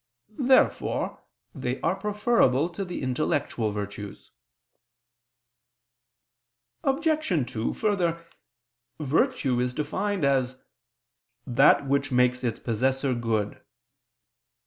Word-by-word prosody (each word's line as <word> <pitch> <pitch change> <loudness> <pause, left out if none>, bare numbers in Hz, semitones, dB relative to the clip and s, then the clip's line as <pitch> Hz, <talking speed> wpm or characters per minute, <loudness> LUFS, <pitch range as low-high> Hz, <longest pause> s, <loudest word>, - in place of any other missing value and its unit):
Therefore 260 -1 +2 0.3
they 130 -3 -3
are 170 +3 +1
preferable 200 - +2
to 180 +3 -5
the 180 -6 -5
intellectual 125 -4 -1
virtues. 100 -1 -7 2.5
Obj. 280 - +1
2: 110 0 -2
Further, 175 -6 0 0.7
virtue 150 - +1
is 125 0 -1
defined 185 +4 -1
as 130 -2 +1 0.9
"that 135 +3 +4
which 140 +1 0
makes 125 0 +2
its 115 -3 -1
possessor 130 +3 0
good." 115 -3 -2
140 Hz, 85 wpm, -26 LUFS, 125-185 Hz, 2.5 s, that